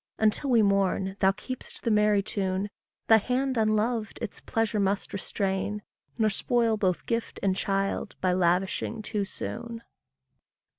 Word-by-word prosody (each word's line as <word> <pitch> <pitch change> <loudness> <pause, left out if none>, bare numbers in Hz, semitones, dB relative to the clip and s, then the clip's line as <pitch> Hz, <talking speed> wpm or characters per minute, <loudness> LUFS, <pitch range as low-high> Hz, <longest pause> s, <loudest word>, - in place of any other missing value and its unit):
Until 220 +6 +1
we 235 -3 +5
mourn, 195 -1 +1
thou 190 -1 +5
keep'st 255 +6 -7
the 230 - +1
merry 210 -1 +4
tune; 195 0 -2 0.3
Thy 225 - +7
hand 260 +4 0
unloved 220 0 +1
its 230 -4 -5
pleasure 225 -1 -1
must 200 0 0
restrain, 200 +1 -2 0.3
Nor 220 -2 +3
spoil 230 +1 +1
both 185 -4 0
gift 230 -1 -2
and 190 -1 +2
child 195 +1 -1
by 185 -1 +2
lavishing 185 +5 0
too 210 -2 -2
soon. 235 +3 -6
210 Hz, 140 wpm, -28 LUFS, 195-225 Hz, 0.3 s, Thy